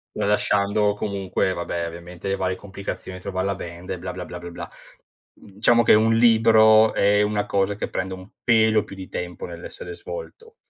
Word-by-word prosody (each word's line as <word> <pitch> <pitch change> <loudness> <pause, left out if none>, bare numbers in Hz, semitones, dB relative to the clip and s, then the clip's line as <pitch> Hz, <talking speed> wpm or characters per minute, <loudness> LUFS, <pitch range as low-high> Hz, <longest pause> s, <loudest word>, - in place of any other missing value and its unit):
Tralasciando, 105 0 +1
comunque, 100 -2 -2
vabbè, 85 -1 -3
ovviamente, 85 +2 -9
le 95 - +1
varie 95 -1 -2
complicazioni, 95 -2 -7
trovare 95 0 -3
la 100 0 -1
band 85 0 -8
e 95 - -3
bla, 90 +1 -6
bla, 90 0 -7
bla, 85 +1 -8
bla, 85 0 -8
bla. 85 - -8 0.6
Diciamo 110 +4 +1
che - - +6
un 110 +1 +4
libro 110 -1 +6
è 105 +1 +3
una 105 0 0
cosa 100 +1 0
che - - -4
prende 95 0 -3
un 95 +1 -11
pelo 110 -2 +4
più 95 - -11
di 95 -1 -9
tempo 90 -1 -5
nell'essere 85 - -8
svolto. 460 0 -9
100 Hz, 180 wpm, -23 LUFS, 90-110 Hz, 0.6 s, che